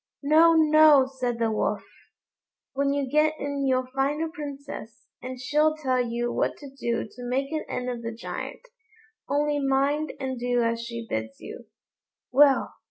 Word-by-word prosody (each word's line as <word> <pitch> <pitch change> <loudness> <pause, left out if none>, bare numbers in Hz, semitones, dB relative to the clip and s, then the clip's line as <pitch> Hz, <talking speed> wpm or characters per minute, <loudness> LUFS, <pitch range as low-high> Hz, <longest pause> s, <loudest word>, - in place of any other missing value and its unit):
"No! 320 +3 +6
no!" 310 -3 +6
said 255 -3 -3
the 230 -1 0
Wolf; 215 - -1 0.9
"when 280 +1 +1
you 280 -1 -1
get 305 +3 +2
in 280 -1 -2
you'll 255 -1 +1
find 275 +3 0
a 325 0 -1
Princess, 280 -7 -8 0.2
and 255 0 -7
she'll 300 +4 +2
tell 260 -4 +1
you 240 0 -2
what - - -1
to 280 -2 -11
do 235 -4 -2
to - - -22
make 265 +3 -2
an 310 -1 -2
end 250 - -3
of 245 -2 -4
the 230 0 -4
Giant. 230 - -7 0.6
Only 290 +1 +1
mind 275 +3 +1
and 260 -2 -4
do 245 0 +1
as 230 0 0
she 235 0 -6
bids 110 - -4
you." - - -10 0.6
Well! 275 +1 +4
270 Hz, 165 wpm, -26 LUFS, 245-295 Hz, 0.9 s, No